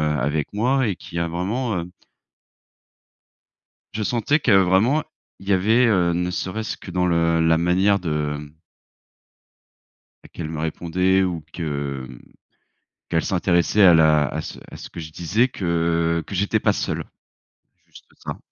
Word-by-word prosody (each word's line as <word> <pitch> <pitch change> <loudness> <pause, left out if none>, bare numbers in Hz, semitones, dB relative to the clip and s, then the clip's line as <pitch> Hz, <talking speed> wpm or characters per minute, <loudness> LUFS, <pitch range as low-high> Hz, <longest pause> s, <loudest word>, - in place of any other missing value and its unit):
avec 75 +1 -1
moi 125 +4 +1
et 95 - -2
qui 85 - -8
a 85 0 -1
vraiment, 100 +4 -2
hem 85 +1 -8 2.0
Je 105 0 -2
sentais 125 +7 +1
que 115 -8 +2
vraiment, 95 +11 +3 0.4
il 95 - -9
y - - +4
avait, 110 +7 +3
heu, 90 -6 +2
ne 90 +1 -1
serait-ce 110 +5 -4
que 95 - -10
dans 90 0 +1
le 85 -1 +2
la 80 0 +3
manière 95 +4 +2
de, 75 -3 -2
mmh 75 +1 -11 1.7
bah - - -15
qu'elle 80 -2 -5
me 80 -1 -5
répondait 90 +4 +1
ou 85 -4 -3
que, 70 -5 -4
mmh, 65 -1 -12 0.9
qu'elle 80 -1 0
s'intéressait 90 +2 +2
à 90 -3 +8
la 75 -2 +4
à - - -4
ce - - -8
à - - -9
ce - - -10
que - - -8
je 80 -1 -8
disais 105 +11 +1
que 85 -4 0
que 100 - -7
j'étais 100 +2 +1
pas - - +2
seul. - - -3 0.8
Juste - - -16
ça. - - -7
85 Hz, 160 wpm, -22 LUFS, 80-100 Hz, 2.0 s, à